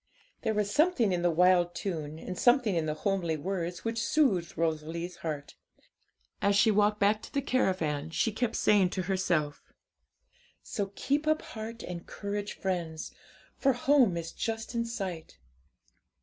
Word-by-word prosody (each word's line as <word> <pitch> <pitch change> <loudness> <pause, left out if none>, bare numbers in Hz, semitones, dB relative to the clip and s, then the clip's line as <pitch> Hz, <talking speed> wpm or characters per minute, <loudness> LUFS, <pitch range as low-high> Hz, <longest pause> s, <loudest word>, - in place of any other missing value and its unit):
There 220 - 0
was 205 -1 0
something 295 - +3
in 175 - 0
the 175 - +3
wild 175 +1 +4
tune, 160 -5 -4
and 180 +3 -6
something 245 -2 +3
in 160 -2 0
the 155 - -1
homely 170 -2 -1
words, 175 +2 -4
which 230 0 -1
soothed 205 - +1
Rosalie's 165 +2 -2
heart. 150 -3 -5 0.9
As 200 0 +3
she 210 +2 +5
walked 210 0 +3
back 210 +2 +3
to - - -11
the 280 - 0
caravan, 185 - 0
she 220 +7 0
kept 230 +1 -1
saying 200 -3 +4
to 185 0 -3
herself 175 -6 0 1.0
'So 200 -3 -3
keep 290 +3 0
up 310 0 +2
heart 225 +1 -7
and 175 -1 -7
courage, 205 0 -4
friends! 170 -4 -3 0.5
For 270 -1 +3
home 250 -7 +3
is 165 0 -4
just 225 +1 -4
in 235 0 0
sight.' 190 -8 -5
190 Hz, 155 wpm, -30 LUFS, 170-225 Hz, 1.0 s, she